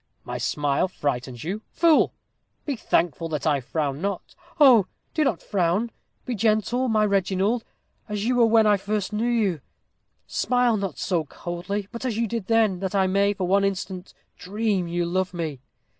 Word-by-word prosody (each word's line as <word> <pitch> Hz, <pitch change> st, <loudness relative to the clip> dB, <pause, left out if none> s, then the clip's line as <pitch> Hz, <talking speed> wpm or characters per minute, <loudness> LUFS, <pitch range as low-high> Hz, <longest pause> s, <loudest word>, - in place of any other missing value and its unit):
"My 125 Hz, 0 st, -5 dB
smile 140 Hz, +6 st, 0 dB
frightens 130 Hz, -7 st, -3 dB
you 195 Hz, +7 st, -3 dB
fool! 335 Hz, -2 st, +3 dB, 0.5 s
be 285 Hz, -, -1 dB
thankful 165 Hz, -, 0 dB
that 150 Hz, -3 st, -3 dB
I 150 Hz, -3 st, +3 dB
frown 140 Hz, +2 st, -3 dB
not." 200 Hz, -1 st, -3 dB, 0.3 s
"Oh! 245 Hz, -10 st, +7 dB, 0.3 s
do 310 Hz, -, +2 dB
not 225 Hz, -, 0 dB
frown. 195 Hz, +4 st, 0 dB, 0.3 s
Be 250 Hz, -, -2 dB
gentle, 225 Hz, +4 st, +1 dB
my 215 Hz, -2 st, +3 dB
Reginald, 200 Hz, +3 st, +1 dB, 0.5 s
as 210 Hz, 0 st, -2 dB
you 250 Hz, +1 st, +2 dB
were 235 Hz, -2 st, +5 dB
when 225 Hz, -1 st, +5 dB
first 205 Hz, 0 st, -2 dB
I -, -, -1 dB
knew 235 Hz, +3 st, +1 dB
you. 205 Hz, -, +1 dB, 0.6 s
Smile 245 Hz, -2 st, +1 dB
not 195 Hz, -8 st, -3 dB
so 170 Hz, -5 st, -1 dB
coldly, 175 Hz, +7 st, -5 dB
but 235 Hz, +1 st, -7 dB
as 245 Hz, -4 st, -2 dB
you 230 Hz, -, +1 dB
did 225 Hz, -2 st, -4 dB
then, 220 Hz, -5 st, +3 dB
that 190 Hz, +1 st, -3 dB
I 190 Hz, -1 st, +3 dB
may, 200 Hz, +2 st, +2 dB
for 190 Hz, -, -2 dB
one 195 Hz, +2 st, +3 dB
instant, 190 Hz, -1 st, -3 dB, 0.2 s
dream 200 Hz, -1 st, -1 dB
you 175 Hz, 0 st, -1 dB
love 185 Hz, +1 st, -1 dB
me." 155 Hz, -6 st, -3 dB
195 Hz, 175 wpm, -24 LUFS, 175-225 Hz, 0.6 s, Oh